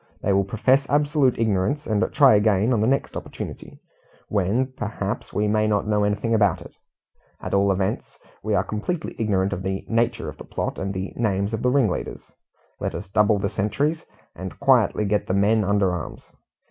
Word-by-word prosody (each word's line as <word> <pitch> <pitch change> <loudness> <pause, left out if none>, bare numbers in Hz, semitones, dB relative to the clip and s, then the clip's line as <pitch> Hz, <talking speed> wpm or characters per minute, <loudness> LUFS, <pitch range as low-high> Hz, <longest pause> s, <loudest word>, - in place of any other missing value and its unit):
They 100 - +2
will 100 0 +2
profess 130 +7 +2
absolute 145 -2 +2
ignorance, 110 +6 0
and 110 -2 0
try 140 -5 +6
again 105 +2 +3
on 110 - +1
the 110 - +2
next 135 +2 0
opportunity, - - -7 0.5
when, 110 +7 0
perhaps, 105 -3 -4
we 105 +1 0
may 110 +1 +2
not 105 -1 +1
know 105 -1 +1
anything 105 +3 0
about 105 -5 +3
it. - - -12 0.7
At - - -6
all 100 0 +3
events, 95 0 -2 0.2
we 105 0 -1
are 95 - +2
completely 155 - -4
ignorant 100 -3 +1
of 95 - -4
the 95 0 -3
nature 115 +1 0
of - - -7
the - - -8
plot - - -4
and 95 0 -2
the 95 0 -5
names 100 -2 -1
of 110 - -2
the 125 - +2
ringleaders. 125 -8 -1 0.5
Let - - -3
us - - -7
double 105 +1 +3
the 100 0 -1
sentries, 140 +10 -1 0.3
and 95 +2 -8
quietly 125 -6 +3
get 105 +1 0
the 95 - 0
men 105 +2 +3
under 100 -1 +2
arms. 85 -3 -6
105 Hz, 185 wpm, -23 LUFS, 100-115 Hz, 0.7 s, try